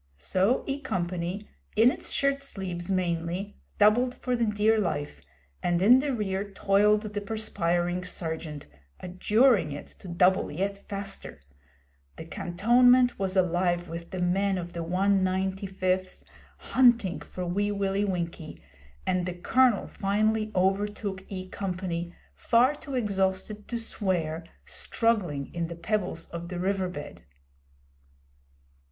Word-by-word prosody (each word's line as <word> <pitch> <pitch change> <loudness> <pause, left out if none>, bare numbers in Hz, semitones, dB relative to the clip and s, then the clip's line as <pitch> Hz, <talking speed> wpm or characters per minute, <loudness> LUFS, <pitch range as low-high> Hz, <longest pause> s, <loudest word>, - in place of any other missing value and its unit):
So 190 - +1
E 275 0 -2
Company, 185 -4 -3 0.3
in 225 +4 +6
its - - -6
shirt 275 0 +1
sleeves 185 -9 -5
mainly, 180 +1 -1 0.2
doubled 240 +5 +4
for 250 0 -1
the 235 -1 +1
dear 210 +1 +3
life, 150 -7 -2 0.4
and 175 -1 +1
in 235 +8 +7
the 285 +1 -1
rear 200 -4 -2
toiled 205 +2 +3
the 205 -1 -4
perspiring 180 -4 -1
Sergeant, 160 -4 -5 0.3
adjuring 205 - +3
it 145 - -6
to - - -11
double 180 +2 +3
yet 195 +6 -1
faster. 195 - -5 0.8
The 160 - -8
cantonment 245 +9 +3
was 190 -1 -1
alive 175 -1 +1
with 170 +1 -7
the 185 - -5
men 190 +2 +1
of 175 -1 -6
the 170 - -3
195th 190 0 0 0.3
hunting 240 -8 +3
for 180 - -6
Wee 205 +4 0
Willie 200 0 0
Winkie, 170 -5 -3 0.5
and 180 -1 0
the 180 - -3
Colonel 245 +4 +3
finally 215 +2 0
overtook 195 +1 0
E 185 -1 -6
Company, 180 -3 -3 0.2
far 245 +4 +3
too 285 -2 -7
exhausted 205 -2 -1
to 240 - -3
swear, 175 -8 -2 0.2
struggling 185 - -1
in 170 -1 -2
the 170 - -7
pebbles 175 -2 -2
of 170 0 -6
the 180 - -4
river 190 0 0
bed. 145 - -8
190 Hz, 130 wpm, -27 LUFS, 175-210 Hz, 0.8 s, in